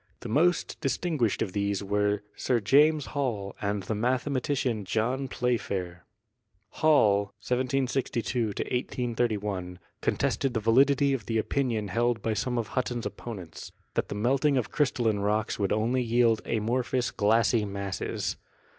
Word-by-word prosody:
The - - -6
most 165 +10 +1
distinguished 135 - 0
of 95 - -5
these 100 -1 -1
were 105 +1 0
Sir 125 -2 +1
James 145 +7 +4
Hall 115 -9 -2
and 100 -1 -1
the 100 - -2
mathematician 125 0 0
John 115 +7 -1
Playfair. 100 -9 -2 0.6
Hall 105 -11 +4 0.2
(1762 125 -1 0
183 120 0 -1
1 90 -3 -5
) - - -44
contested 135 -3 0
the - - +2
validity 135 +5 +4
of 115 -7 -3
the 115 - 0
opinion 110 -2 -1
held 120 +3 0
by 110 - 0
some 125 +4 -1
of 115 -3 -2
Hutton's 120 -3 -2
opponents, 95 -7 -7 0.2
that - - -1
the - - -4
melting 135 +6 +2
of 125 - -1
crystal 135 -4 +1
64 110 - +5
GEOLOGY 105 - -2
line - - -3
rocks 110 0 -4
would 100 -2 0
only 115 +4 +1
yield 115 -1 +3
amorphous 120 +3 0
glassy 110 +1 +3
masses. 100 -1 -3
115 Hz, 145 wpm, -28 LUFS, 105-130 Hz, 0.6 s, 64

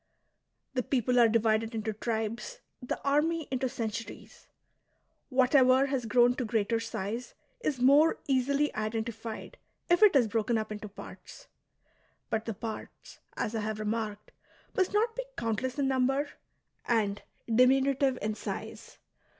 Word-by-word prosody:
The 255 - +1
people 250 -1 +1
are 235 -1 +6
divided 225 0 +1
into 220 0 -2
tribes, 230 - -3 0.2
the 250 - -3
army 300 +3 +1
into 260 0 0
centuries. 230 -1 -6 0.8
Whatever 260 0 +5
has 265 -4 -2
grown 245 +2 +5
to 255 - -1
greater 225 0 0
size 225 +1 -5 0.2
is 300 - -2
more 285 +6 +5
easily 280 +2 +1
identified 225 +1 -4 0.3
if 350 - +4
it 420 -7 +7
is 250 -5 +5
broken 225 +2 0
up 215 0 -3
into 210 0 -6
parts; 200 - -12 0.8
but 220 0 -1
the 225 - -4
parts, 220 +2 -8 0.2
as 215 - -2
I 225 - -1
have 215 0 -3
remarked, 215 -1 -3 0.4
must 375 -1 +2
not 445 +2 +1
be - - -3
countless 230 +4 -2
in 280 -1 +1
number 270 +2 +1 0.6
and 205 -4 +1 0.3
diminutive 265 +2 +3
in 215 0 0
size. - - -7
240 Hz, 135 wpm, -30 LUFS, 220-270 Hz, 0.8 s, it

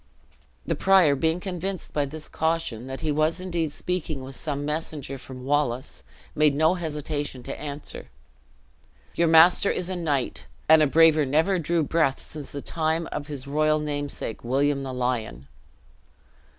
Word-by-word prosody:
The - - 0
prior, 190 -6 +5
being 160 +5 0
convinced 185 0 -5
by 145 -1 +1
this 150 +2 -8
caution, 160 -7 -2
that 135 0 -6
he 155 - 0
was 155 +3 +1
indeed 170 -4 -2
speaking 155 -4 -3
with 135 +1 -7
some 145 -2 -3
messenger 150 -3 -4
from 130 0 -10
Wallace, 135 -3 0 0.3
made 150 -2 +3
no 160 +3 +4
hesitation 150 -5 -4
to 135 - -6
answer. 145 0 -6 1.1
"Your 170 - +2
master 165 +4 +6
is 180 - -1
a 185 - -2
knight, 150 -7 -2 0.2
and 160 0 +7
a 150 - +5
braver 155 +1 +5
never 160 +7 +2
drew 165 0 +1
breath 150 -2 +1
since 150 -3 -8
the 140 - -6
time 160 0 -1
of 145 -1 -4
his 140 -3 -5
royal 155 +2 +2
namesake, 145 -6 -4
William 140 +3 +1
the 135 -1 -5
Lion!" 125 - -3
150 Hz, 155 wpm, -25 LUFS, 140-165 Hz, 1.1 s, and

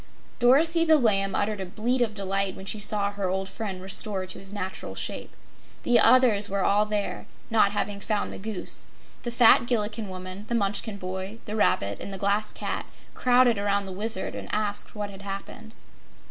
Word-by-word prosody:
Dorothy 315 +7 +4
the 320 -1 +5
Lamb 195 -6 +2
uttered 205 -1 -1
a - - -3
bleat 240 +7 -1
of 220 -3 0
delight 195 -1 -1
when 190 - -10
she 215 - -4
saw 205 -1 +1
her 200 -2 -3
old 190 +1 -2
friend 195 -3 -6
restored 190 -1 +4
to - - -9
his 195 0 -9
natural 190 -2 -6
shape. - - -5 0.5
The 240 -1 +4
others 230 -6 +5
were 195 0 -1
all 210 +1 +3
there, 210 -1 -3 0.2
not 215 -3 +3
having 205 -1 -2
found 205 +1 -2
the - - -7
Goose. 210 -1 -5 0.3
The 240 - -4
fat 235 0 +5
Gillikin 220 -2 -1
woman, 185 +2 -8
the 235 - -1
Munchkin 205 0 -1
boy, 190 +3 -5
the 215 - -5
Rabbit 100 - +1
and - - -6
the 195 - -4
Glass 205 +2 0
Cat - - -4 0.3
crowded 245 -3 +3
around 200 0 0
the 190 - -7
Wizard 205 +1 -2
and - - -7
asked 205 0 -2
what 205 -1 -4
had 195 0 -11
happened. 200 +3 -8
205 Hz, 190 wpm, -26 LUFS, 195-220 Hz, 0.5 s, the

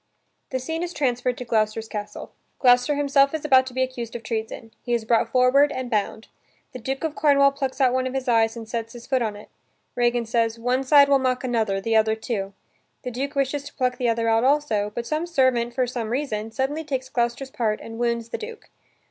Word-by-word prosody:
The 260 - -2
scene 320 +6 -4
is 350 0 -4
transferred 250 -3 0
to 250 - -6
Gloucester's 220 -1 0
castle. 210 -1 -7 0.3
Gloucester 250 +3 +4
himself 280 0 +3
is 310 - -5
about 260 -3 +5
to 255 - -8
be 260 - +2
accused 245 -3 -5
of 235 - -6
treason. 225 0 -5
He 240 - -1
is 225 -2 -3
brought 230 0 +2
forward 260 +3 +4
and 255 -1 -5
bound. 215 +1 -1 0.5
The 255 - -7
Duke 265 +5 -4
of 320 -2 -1
Cornwall 280 -2 +4
plucks 275 -1 -4
out 255 -2 +4
one 255 0 0
of 260 - -5
his 265 0 -3
eyes 225 -1 +2
and 225 -1 -8
sets 230 0 -4
his 240 -1 -11
foot 260 -2 0
on 215 -3 -2
it. 205 - -12 0.5
Regan 240 -1 +1
says, 230 0 0
"One 250 +3 0
side 280 +1 +6
will 280 -1 +4
mock 255 -1 0
another; 220 -6 0
the 225 +3 -1
other 220 0 +3
too." 205 -3 -4 0.5
The 250 - -4
Duke 275 +4 -4
wishes 275 +1 0
to 290 - -11
pluck 250 -2 0
the 245 -2 0
other 230 0 0
out 225 +1 +3
also, 260 -7 +1
but 235 - -3
some 310 +6 -2
servant, 260 -7 +1
for 255 -1 +2
some 240 -3 -4
reason, 225 -4 -2
suddenly 270 +7 -2
takes 265 -4 -3
Gloucester's 240 +2 -2
part 220 -4 -1
and 225 0 -9
wounds 235 -1 -1
the - - -4
Duke. 455 +1 -9
250 Hz, 225 wpm, -24 LUFS, 230-270 Hz, 0.5 s, side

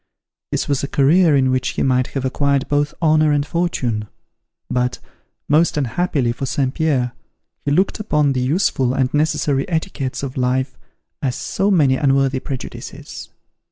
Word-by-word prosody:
This - - -1
was 140 -1 0
a - - -1
career 155 +4 +4
in 130 -1 +3
which 130 0 0
he - - +1
might 130 -1 +2
have 135 -2 -4
acquired 140 +1 +1
both 145 +1 +1
honour 155 -1 +4
and 145 -1 +1
fortune; 130 -11 -1 0.6
but, 125 0 -1 0.5
most 155 +2 +3
unhappily 140 -2 0
for 135 +3 -4
St. 130 -1 0
Pierre, 140 -7 0 0.5
he - - +1
looked 185 +10 +1
upon 150 -9 +1
the 130 - -1
useful 130 -3 +1
and 130 -1 0
necessary 150 -2 +1
etiquettes 155 -6 -3
of 135 -1 -5
life 130 +1 0 0.5
as 130 -3 -1
so 195 - -1
many 145 -9 +3
unworthy 135 -2 +2
prejudices. 130 -1 -7
140 Hz, 155 wpm, -19 LUFS, 130-155 Hz, 0.6 s, career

